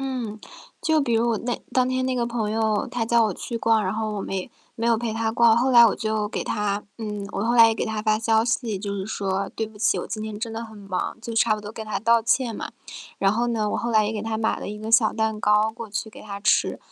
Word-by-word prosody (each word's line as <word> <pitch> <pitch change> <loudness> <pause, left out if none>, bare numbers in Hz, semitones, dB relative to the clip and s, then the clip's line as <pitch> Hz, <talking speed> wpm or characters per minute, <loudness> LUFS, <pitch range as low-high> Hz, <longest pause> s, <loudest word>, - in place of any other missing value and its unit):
嗯， 250 -5 -4 0.4
就 315 -1 +2
比 245 -5 -1
如 235 +1 +2
我 220 - 0
那 245 0 -3
当 255 -1 +2
天 255 0 0
那 260 - 0
个 240 -1 0
朋 230 -3 -2
友， 220 -2 +1
他 240 -2 -2
叫 235 0 +3
我 205 -5 -1
去 235 -1 -5
逛， 225 -1 +3
然 190 +1 -1
后 215 -1 -2
我 200 - -3
没 190 -1 -4 0.3
没 230 0 -1
有 230 -1 +4
陪 230 -1 -3
他 225 0 -1
逛， 230 -1 +5
后 255 +2 +2
来 235 -1 +9
我 220 - +4
就 215 -1 -2
给 - - -4
他 205 -1 -1 0.2
嗯， 210 -2 -4
我 200 - -2
后 240 +2 +1
来 230 - +9
也 225 - +2
给 - - -2
他 220 -1 -3
发 215 0 +2
消 225 0 +2
息， 230 -4 -1
就 200 0 -4
是 190 -1 -3
说 195 -2 -2
“对 220 - -1
不 215 -1 -15
起， 210 0 +2
我 - - -4
今 215 - -5
天 215 -1 -5
真 225 0 -4
的 230 +1 -4
很 220 -2 -12
忙”， 195 +2 -4
就 230 0 -6
差 225 -1 +3
不 - - -8
多 210 +1 -8
跟 220 0 -7
他 210 -2 -2
道 230 +2 +3
歉 235 0 +1
嘛。 - - -5 0.5
然 195 0 +3
后 240 +2 0
呢， 220 -3 0
我 - - -1
后 235 - -2
来 215 -2 +4
也 220 - -2
给 210 - -4
他 220 0 -2
买 225 - 0
了 - - -5
一 210 - -6
个 215 +1 -6
小 230 -2 +5
蛋 220 -1 -1
糕， 210 +1 +3
过 230 -3 -8
去 220 +1 -3
给 - - -13
他 200 -1 -7
吃， 205 - +2
220 Hz, 300 characters per minute, -24 LUFS, 210-230 Hz, 0.5 s, 来